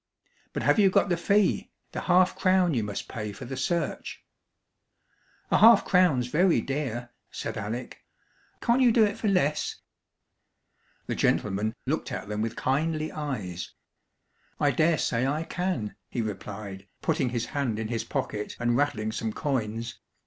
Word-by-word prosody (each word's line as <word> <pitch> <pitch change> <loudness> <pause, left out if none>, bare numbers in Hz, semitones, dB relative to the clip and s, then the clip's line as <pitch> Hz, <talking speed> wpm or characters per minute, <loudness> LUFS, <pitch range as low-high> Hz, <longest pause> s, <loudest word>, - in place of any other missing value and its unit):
"But - - -2
have - - +4
you 200 -2 +6
got 190 - +3
the 175 - +3
fee? 200 +3 +2 0.2
the - - -4
half 180 +1 +4
crown 185 -3 +3
you 115 -4 +1
must 105 -1 -4
pay 105 -4 -5
for - - -9
the 135 +2 -5
search?" 170 +6 -2 1.3
"A - - +4
half 225 -1 +8
crown's 180 -10 +4
very 165 +8 +3
dear," 125 -4 -3 0.2
said - - -5
Alec. 115 +5 -5 0.6
"Can't 240 +3 +3
you 245 -2 +6
do 225 -1 +5
it 205 0 -1
for 220 - -2
less?" 180 -7 +1 1.3
The - - -2
gentleman 105 +2 +1
looked 145 +1 -2
at 125 - -5
them 105 0 -2
with 115 0 -2
kindly 155 +3 0
eyes. 105 - -5 0.8
"I 145 - +3
dare 155 +5 +3
say 120 0 0
I 150 +4 0
can," 180 - -2
he 120 - -2
replied, 100 -1 -6 0.2
putting 150 -5 +1
his 120 -1 -2
hand 135 -7 0
in 110 0 -3
his 115 -2 -1
pocket, 105 0 -3
and 120 0 +1
rattling 115 -6 0
some 110 0 -2
coins. 115 -3 -3
135 Hz, 155 wpm, -27 LUFS, 110-170 Hz, 1.3 s, half